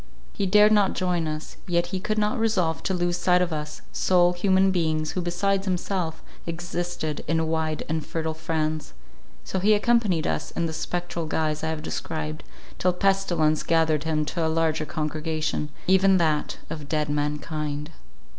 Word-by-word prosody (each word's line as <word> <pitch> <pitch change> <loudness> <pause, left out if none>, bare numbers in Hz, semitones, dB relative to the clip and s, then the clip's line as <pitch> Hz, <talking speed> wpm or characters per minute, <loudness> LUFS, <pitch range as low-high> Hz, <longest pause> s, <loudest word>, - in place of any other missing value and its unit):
He 195 - -1
dared 210 +2 +6
not 205 -3 +4
join 175 -3 0
us, 155 0 -5
yet 170 -1 +2
he 190 - 0
could 215 +3 -2
not 215 +3 +1
resolve 185 -8 +1
to 190 - -1
lose 175 0 0
sight 180 0 +3
of 175 -2 -2
us, 150 -1 -5
sole 180 -1 +3
human 190 +1 +3
beings 155 -3 0
who 185 - -2
besides 195 +3 0
himself 180 -3 -2 0.2
existed 175 -2 -3
in 160 +1 +1
wide 160 -1 -1
and 160 0 -1
fertile 160 0 -3
France; 155 - -2 0.5
so 190 - -2
he 210 +3 +4
accompanied 210 -7 +2
us - - -1
in 170 - -2
the 160 - -3
spectral 170 0 -3
guise 155 -1 -1
I 160 - 0
have 160 -1 -3
described, 155 -1 -4 0.4
till 180 0 +2
pestilence 180 -5 +2
gathered 160 -2 +2
him 155 -2 0
to 170 +2 -2
a - - +2
larger 160 -1 +1
congregation, 155 -1 -2 0.2
even 190 +1 +5
that 155 -4 +1
of 150 -3 -6
Dead 150 -1 0
Mankind. 150 0 -2
165 Hz, 165 wpm, -25 LUFS, 155-185 Hz, 0.5 s, dared